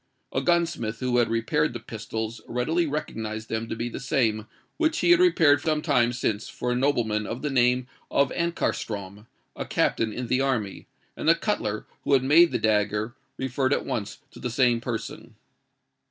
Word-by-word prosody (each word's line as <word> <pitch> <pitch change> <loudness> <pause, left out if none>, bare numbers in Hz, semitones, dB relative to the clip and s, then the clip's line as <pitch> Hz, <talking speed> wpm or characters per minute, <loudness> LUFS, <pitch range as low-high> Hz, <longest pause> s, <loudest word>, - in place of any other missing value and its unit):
A - - +1
gunsmith 170 -11 0
who 125 -1 0
had 120 - +2
repaired 120 +5 +1
the 120 - -5
pistols 110 0 -5
readily 155 +8 0
recognised 110 -7 -4
them 115 0 -3
to - - -3
be 115 +1 -3
the 120 - -6
same 115 -5 0 0.3
which 320 0 +1
he 350 - +4
had 350 - +7
repaired 160 - +5
some 155 -1 0
time 120 -6 +3
since 110 -3 -2
for 125 - -3
a - - +1
nobleman 120 -5 +1
of 120 +5 -5
the 150 - -1
name 125 -1 +3 0.2
of 140 -1 +2
Ankarstrom, 105 - -3 0.3
a - - -4
captain 110 -1 +1
in 125 +3 -4
the 125 +2 +1
army; 120 -8 -2 0.3
and 155 - 0
the 165 - +7
cutler 110 - -2 0.2
who - - +1
had 130 -2 +4
made 160 +5 +6
the - - +1
dagger, 105 +1 +1 0.2
referred 130 +1 0
at - - -1
once 100 -4 -3
to - - -13
the 125 - -3
same 120 -1 +2
person. 120 -2 -6
125 Hz, 185 wpm, -26 LUFS, 110-145 Hz, 0.3 s, had